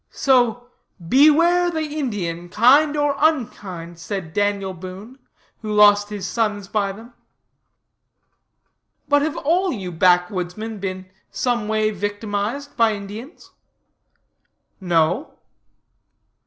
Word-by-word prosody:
So 245 -2 +1 0.4
"beware 335 +6 +5
the 320 -2 -3
Indian, 205 - -4
kind 280 - +4
or 290 -1 +1
unkind," 195 - -2
said 180 -3 -6
Daniel 205 -2 -1
Boone, 190 +8 -10 0.4
who 215 -1 -5
lost 205 0 +5
his 205 -3 -5
sons 210 -4 -2
by 200 -1 -1
them. 225 +5 -13 1.9
But, 290 0 +3
have 305 +1 -2
all 355 +5 +1
you 190 -7 -5
backwoodsmen 180 +4 0
been 185 -1 -5 0.2
some 240 -4 -1
way 215 0 +1
victimized 205 +6 -4
by 225 -2 +3
Indians? 210 - -10 1.3
No. 175 - 0
210 Hz, 100 wpm, -21 LUFS, 190-265 Hz, 1.9 s, beware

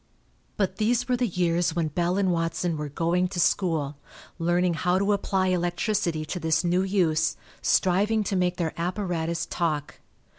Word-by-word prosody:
But 190 -2 0
these 235 +3 +1
were 250 - +2
the 245 0 0
years 175 -2 0
when 165 -2 0
Bell 175 +4 0
and 195 -2 +2
Watson 165 0 -1
were 150 -1 -4
"going 170 +5 +1
to 180 -1 -5
school," 160 -6 +1 0.4
learning 175 +1 +2
how 180 +2 +1
to 200 +2 +2
apply 190 -2 0
electricity 175 -2 0
to 180 - -4
this 160 0 +1
new 175 +1 +2
use, 175 -5 +1 0.2
striving 205 +4 +2
to 200 - -2
make 180 -1 +1
their 165 -3 -1
apparatus 170 -3 -2
talk. 155 -4 -2
175 Hz, 160 wpm, -26 LUFS, 165-190 Hz, 0.4 s, were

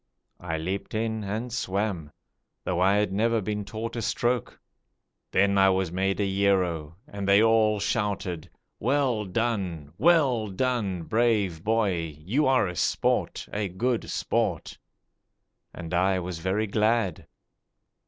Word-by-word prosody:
I 80 -2 -3
leaped 95 +7 -4
in 110 0 -1
and 110 +4 -4
swam, 95 -8 -2 0.5
though 90 -1 -1
I 95 +2 +4
had 105 -2 +1
never 115 +3 +2
been 105 0 -3
taught 110 +4 -5
a 115 - -2
stroke. 120 +2 -1 0.7
Then 100 +1 +3
I 95 0 +6
was 95 -2 0
made 95 +2 0
a 100 - +1
hero, 95 -5 0
and 100 -7 -5
they 100 +2 +6
all 110 -2 +3
shouted: 100 -6 -2 0.3
'Well 125 -3 +1
done! 95 -8 -2
Well 135 -7 +3
done, 100 -4 -1
Brave 105 -6 +1
boy, 95 -9 0
you 115 - 0
are 130 -6 +3
a 90 - -5
sport, - - 0
a 105 -1 -1
good 115 +6 -1
sport!' - - -1 0.9
And 85 -1 -8
I 95 +2 +2
was 90 -2 -4
very 95 +5 0
glad. 110 -3 0
100 Hz, 135 wpm, -26 LUFS, 90-115 Hz, 0.9 s, I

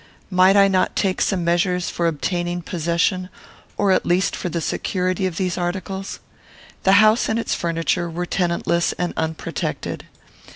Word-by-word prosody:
Might 185 +2 +5
I 200 0 +7
not 190 -1 +1
take 190 -2 0
some 185 -4 +1
measures 175 +1 +1
for 170 - 0
obtaining 175 +2 -2
possession, 170 +2 0 0.5
or 200 -2 +2
at 185 - +3
least 180 +3 +1
for 180 - -4
the 170 - -2
security, 185 +3 -1
of 170 -3 -6
these 185 -2 -1
articles? 190 +2 -4 0.7
The 190 - +6
house 215 +3 +5
and 220 - +1
its 230 - -1
furniture 170 +1 -1
were 175 +2 -3
tenantless 170 -1 0
and 180 0 -2
unprotected. 160 0 -3
180 Hz, 155 wpm, -21 LUFS, 170-190 Hz, 0.7 s, I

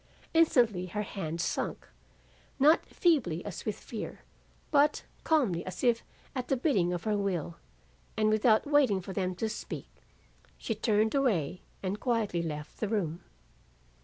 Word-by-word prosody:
Instantly 240 - +4
her 210 +4 -2
hand 170 -5 -4
sunk, - - -2 0.7
not 305 +4 +5
feebly 245 - +1
as 200 -6 -6
with 215 -2 -2
fear, 225 - -7 0.5
but 295 0 +3 0.2
calmly 245 - +2
as 185 +4 -7
if 235 -2 +3 0.3
at 250 -1 -3
the 270 - +1
bidding 210 - +2
of 175 -1 -3
her 215 -1 +1
will, 180 -5 -2 0.6
and 215 0 +3
without 215 0 +4
waiting 285 -9 +4
for 190 +1 -7
them 185 -2 -1
to 220 +5 -1
speak, 215 - -6 0.7
she 225 - -2
turned 215 0 +1
away 190 - +1 0.2
and 195 +2 -2
quietly 220 -8 0
left 150 -2 -6
the 215 - 0
room. 180 -6 -1
210 Hz, 145 wpm, -30 LUFS, 180-245 Hz, 0.7 s, not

